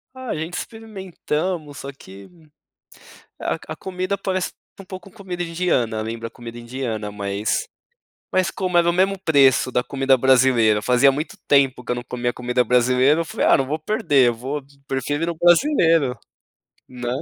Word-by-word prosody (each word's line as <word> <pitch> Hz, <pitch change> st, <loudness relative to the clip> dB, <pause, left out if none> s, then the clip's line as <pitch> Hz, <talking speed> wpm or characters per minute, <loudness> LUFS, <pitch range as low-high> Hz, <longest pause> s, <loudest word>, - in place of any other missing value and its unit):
Ah, 260 Hz, -1 st, -8 dB
a -, -, -1 dB
gente 160 Hz, +3 st, -5 dB
experimentamos, 185 Hz, -, -4 dB
só 140 Hz, -, -6 dB
que 100 Hz, -7 st, -14 dB, 1.1 s
a -, -, -2 dB
a -, -, -9 dB
comida 185 Hz, +1 st, -3 dB
parece 185 Hz, -1 st, -2 dB, 0.3 s
um 195 Hz, -, -10 dB
pouco 185 Hz, 0 st, -9 dB
com -, -, -21 dB
comida 180 Hz, -3 st, -5 dB
indiana, 165 Hz, -10 st, 0 dB
lembra 115 Hz, +1 st, -5 dB
a -, -, -13 dB
comida 120 Hz, 0 st, -10 dB
indiana, 120 Hz, -4 st, -4 dB
mas 100 Hz, +1 st, -2 dB, 0.7 s
mas 185 Hz, -1 st, +2 dB
como 185 Hz, -2 st, -3 dB
era 170 Hz, 0 st, +4 dB
o -, -, +4 dB
mesmo 190 Hz, +2 st, +2 dB
preço 135 Hz, -7 st, +4 dB
da 125 Hz, -, +1 dB
comida 135 Hz, -1 st, +2 dB
brasileira, 125 Hz, -5 st, +4 dB
fazia 125 Hz, +3 st, +4 dB
muito 155 Hz, +8 st, -5 dB
tempo 135 Hz, -3 st, +3 dB
que -, -, -3 dB
eu 125 Hz, -, 0 dB
não 120 Hz, -, -4 dB
comia 120 Hz, 0 st, -3 dB
comida 125 Hz, 0 st, 0 dB
brasileira, 125 Hz, +6 st, +3 dB
eu -, -, -4 dB
falei: -, -, -2 dB
"Ah, -, -, +6 dB
não 135 Hz, -1 st, -1 dB
vou 155 Hz, -, -1 dB
perder, 155 Hz, -, +2 dB
eu 120 Hz, -, -1 dB
vou 135 Hz, +5 st, -5 dB, 0.2 s
prefiro 145 Hz, +4 st, -2 dB
ir -, -, 0 dB
no 170 Hz, -, -2 dB
brasileiro, 165 Hz, -, +3 dB, 0.7 s
né?". 125 Hz, -1 st, -6 dB
140 Hz, 180 wpm, -21 LUFS, 125-175 Hz, 1.1 s, Ah